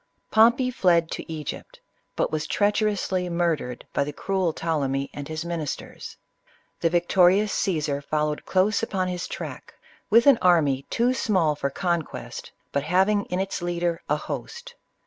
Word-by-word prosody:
Pom 225 +2 +7
pey 255 0 -1
fled 170 -7 +2
to - - -6
Egypt, 155 -3 -6 0.4
but - - 0
was 155 -1 -2
treacherously 205 -3 0
murdered 165 -8 -1
by - - +2
the 145 - -4
cruel 190 +1 -1
Ptolemy 140 -4 -2
and 145 -1 -6
his 155 +1 -4
ministers. 165 -4 -5 0.6
The 165 - +2
victorious 180 +4 +3
Caesar 150 -6 -1
followed 150 +1 -1
close 195 +3 +2
upon 190 -5 -1
his 180 0 -4
track, - - -7 0.3
with 230 +2 +5
an 280 -4 +6
army 145 -7 +3
too 240 +2 +2
small 185 -11 +1
for 140 -1 -2
conquest, 170 +1 -3 0.2
but 140 - 0
having 190 +6 +2
in 180 - -3
its 190 -1 -2
leader 175 -1 -1
a - - +3
host. 485 +1 -6
175 Hz, 150 wpm, -25 LUFS, 155-195 Hz, 0.6 s, Pom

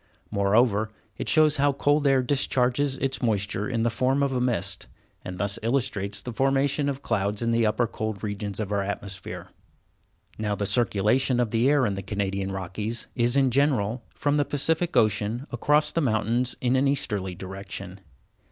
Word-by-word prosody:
Moreover, 105 +2 +2 0.3
it - - -2
shows 155 -1 +4
how 140 0 +3
cold 145 +1 +2
air 135 -2 +4
discharges 135 0 +1
its 135 -3 -2
moisture 105 -2 0
in 115 -3 0
the 120 - +1
form 130 +4 +1
of 140 -1 0
a 125 - 0
mist, 100 -6 -1 0.4
and 90 0 -6
thus 100 +2 -1
illustrates 110 -5 -1
the 125 +3 -6
formation 135 +3 +1
of 140 - -1
the 135 - -16
clouds 105 -1 -1
in 115 - +1
the 115 -1 +3
upper 110 +3 +1
cold 110 -2 -5
regions 105 -1 -4
of 105 -2 -3
our 100 -1 +1
atmosphere. 100 -1 -5 0.9
Now 105 -1 -1
the 100 - -2
circulation 120 +3 +2
of 120 -3 0
the 115 +4 +3
air 145 -3 +3
in 105 - 0
the 95 - -4
Canadian 100 0 -2
Rockies 95 +5 -4
is, 120 +1 +1
in 135 -2 +3
general, 125 -4 +1
from 145 0 +1
the 145 - +3
Pacific 160 +5 0
Ocean 110 +4 +1
across 150 0 +2
the 165 - 0
mountains 120 0 0
in 125 0 +2
an 135 +2 +3
easterly 105 -9 -1
direction. 95 0 -7
115 Hz, 180 wpm, -26 LUFS, 100-135 Hz, 0.9 s, shows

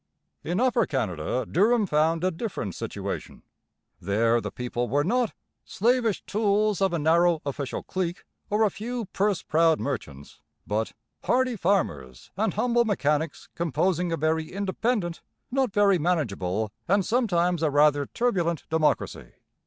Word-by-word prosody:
In 175 +5 -1
Upper 245 -3 +2
Canada 110 - -2
Durham 215 +5 +3
found 160 0 +1
a 185 - +2
different 165 - -4
situation. - - -6 0.6
There 115 +5 +2
the - - -4
people 120 -1 -3
were 145 +4 +2
not 240 +6 +1 0.3
'slavish 230 -1 +1
tools 210 -1 +1
of 195 -1 +3
a 170 - 0
narrow 165 +2 +3
official 140 -1 -4
clique 180 -1 -3 0.3
or 210 +2 +2
a 210 - +3
few 235 +3 -4
purse 195 -1 0
proud 160 0 +3
merchants,' 75 - -5 0.3
but 110 +2 -2 0.3
'hardy 255 -1 +2
farmers 85 - -1
and 210 0 0
humble 240 +2 +2
mechanics 160 -7 -1
composing 170 +2 0
a 165 - 0
very 160 +1 0
independent, 200 -1 -1 0.3
not 260 -3 +1
very 200 -2 +4
manageable, 110 - -1 0.2
and 195 +1 +2
sometimes 180 -8 +1
a 160 - +2
rather 145 -1 +3
turbulent 175 -9 -1
democracy.' 155 - 0
175 Hz, 135 wpm, -26 LUFS, 145-210 Hz, 0.6 s, very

